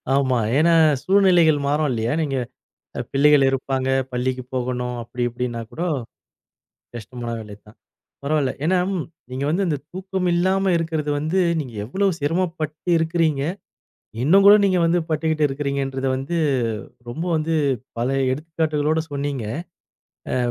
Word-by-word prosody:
ஆமா. 130 -3 +2 0.2
ஏன்னா 165 +2 +4 0.3
சூழ்நிலைகள் 180 -6 +4
மாறும் 150 +1 +1
இல்லையா? 115 -1 -1
நீங்கப் 135 -5 -2 0.6
பிள்ளைகள் 140 0 +5
இருப்பாங்க. 135 0 -1 0.2
பள்ளிக்கு 125 +1 -2
போகணும். 125 -1 -2
அப்டி 120 +1 -4
இப்டின்னாக்கூட 120 +4 -5 1.1
கஷ்டமான 120 +1 -6
வேலைதான். 105 +1 -12 0.5
பரவாயில்ல. 145 -2 +1
ஏன்னா 185 +3 +3 0.5
நீங்க 130 +2 -3
வந்து 185 +5 +1
அந்தத் 150 -4 -2
தூக்கம் 190 0 -2
இல்லாம 190 +2 +2
இருக்கிறது 160 -3 -2
வந்து, 160 +6 0 0.2
நீங்க 125 -6 -7
எவ்வளோ 190 - 0
சிரமப்பட்டு 165 0 -2
இருக்கிறீங்க. 160 -3 +1 0.8
இன்னும் 195 +8 +5
கூட 205 - +10
நீங்க 185 -2 +3
வந்து 170 +1 +3
பட்டுகிட்டு 155 -1 +1
இருக்கிறீங்கன்றத 135 -1 -2
வந்து 135 +6 -3 0.7
ரொம்ப 160 +8 -4
வந்து 155 +1 -1 0.5
பல 120 +2 0 0.2
எடுத்துக்காட்டுகளோட 155 +1 0
சொன்னீங்க. 140 -4 -3 0.9
ஆ - - +1
145 Hz, 115 wpm, -22 LUFS, 130-165 Hz, 1.1 s, கூட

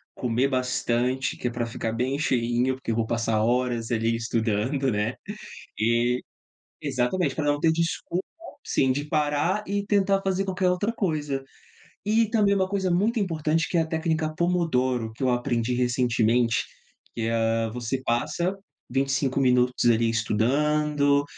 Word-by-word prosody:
comer 125 +2 +1
bastante, 125 0 0
que 125 - -2
é - - -8
para 120 0 -2
ficar 115 -1 -3
bem 125 +4 -1
cheinho, 125 -2 +1
porque 130 -3 -4
eu - - 0
vou 115 0 0
passar 115 -1 0
horas 120 -1 0
ali 115 0 +1
estudando, 115 +4 0
né, 105 +3 -1 0.6
e, 120 +3 +2 0.6
exatamente, 130 +9 0
para 155 - -2
não 145 0 +1
ter 160 +1 +3
desculpa, 170 +2 -1 0.4
sim, 130 -1 +2
de 145 +3 -2
parar 150 +6 0
e 200 0 -1
tentar 195 -1 +2
fazer 195 0 0
qualquer 185 -1 0
outra 205 +5 0
coisa, 150 -10 -2 0.6
e 220 +2 +3
também 210 -3 +3
uma 190 -1 +1
coisa 195 -2 0
muito 215 +6 +2
importante 165 -3 0
que 175 - 0
é - - +4
a 160 - -2
técnica 160 -1 -1
pomodoro, 130 -10 0
que 110 - -14
eu 130 - +3
aprendi 120 -1 0
recentemente, 120 -1 +2 0.5
que, 115 -1 -1
ah, 115 0 +1
você 125 +2 -3
passa 170 +10 0 0.4
25 135 +1 0
minutos 125 -1 +2
ali 115 0 +3
estudando, 140 +6 +2
130 Hz, 150 wpm, -25 LUFS, 120-165 Hz, 0.6 s, é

